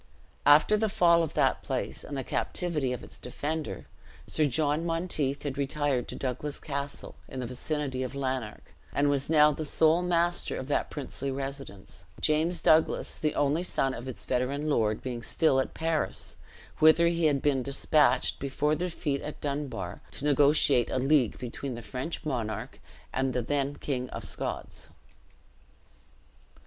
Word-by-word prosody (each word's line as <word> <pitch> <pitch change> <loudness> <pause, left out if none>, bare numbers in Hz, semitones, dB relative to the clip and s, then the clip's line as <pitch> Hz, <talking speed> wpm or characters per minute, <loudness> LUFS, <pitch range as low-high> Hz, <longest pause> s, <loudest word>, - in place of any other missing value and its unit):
After 150 +9 +6
the 220 0 +1
fall 170 -5 +4
of 160 - -3
that - - +2
place - - -3
and 145 - -6
the 135 - -2
captivity 155 -6 -1
of 125 - -4
its - - -9
defender, 150 +5 -4 0.4
Sir 155 - +1
Jon 150 +3 +1
Monteith 165 -5 -1
had 140 -1 -4
retired 140 -2 0
to - - -6
Douglas 135 +3 -3
Castle, 140 -1 -5
in 130 - -7
the 125 - -3
vicinity 130 +2 -3
of 130 +1 -4
Lanark, 130 -5 -4 0.2
and 145 0 +2
was 140 0 0
now 150 -1 +6
the 155 +2 -4
sole 160 +3 +3
master 175 0 +1
of 130 - -5
that - - 0
princely 140 -1 -3
residence: 135 -10 -6 0.2
James 160 +2 +2
Douglas, 160 0 +3
the 155 -1 0
only 145 +3 +2
son 135 -7 0
of 125 0 -7
its 130 - -5
veteran 140 +4 -1
lord, 110 -5 +1
being 125 -2 -4
still 135 +2 +2
at 130 - -2
Paris, 160 -1 -1 0.4
whither 160 +2 +6
he 170 -1 +1
had 145 -3 +3
been 140 -3 +2
dispatched, 140 0 +2
before 140 +2 0
the 175 +4 -1
defeat 150 -5 -2
at 150 - -7
Dunbar, 140 -11 -4
to 145 - -6
negotiate 145 -3 +4
a - - -1
league 135 -2 +3
between 125 +1 -5
the 120 - -8
French 135 +9 -5
monarch 120 -7 -3 0.3
and 130 -1 0
the 125 - 0
then 140 +2 -1
King 130 -4 -3
of - - -6
Scots. - - -4
145 Hz, 160 wpm, -29 LUFS, 130-155 Hz, 0.4 s, After